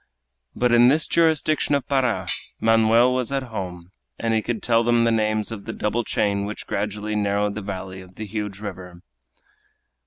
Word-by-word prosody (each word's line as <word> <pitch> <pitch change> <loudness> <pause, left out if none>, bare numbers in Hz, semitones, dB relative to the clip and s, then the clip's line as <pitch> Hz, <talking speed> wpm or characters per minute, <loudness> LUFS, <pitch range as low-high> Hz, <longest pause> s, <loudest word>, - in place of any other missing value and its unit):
But 125 0 +1
in 120 +1 +6
this 150 +5 +3
jurisdiction 155 -3 +2
of 140 -1 -2
Para, 135 -3 +1 0.3
Manoel 115 +2 +4
was 125 0 -2
at 135 -1 -1
home, 90 -3 -6 0.3
and 115 -1 -1
he 110 - +2
could 115 0 -4
tell 115 -1 +3
them 120 0 +3
the 115 - +3
names 110 -1 0
of 105 -3 -7
the 110 - -5
double 115 +3 -1
chain 100 -2 0
which 105 +1 -6
gradually 105 +1 -3
narrowed 100 0 0
the 105 - -5
valley 95 -1 -6
of 90 0 -16
the 110 - -6
huge 105 -1 -5
river. 90 -4 -8
110 Hz, 180 wpm, -23 LUFS, 100-120 Hz, 0.3 s, in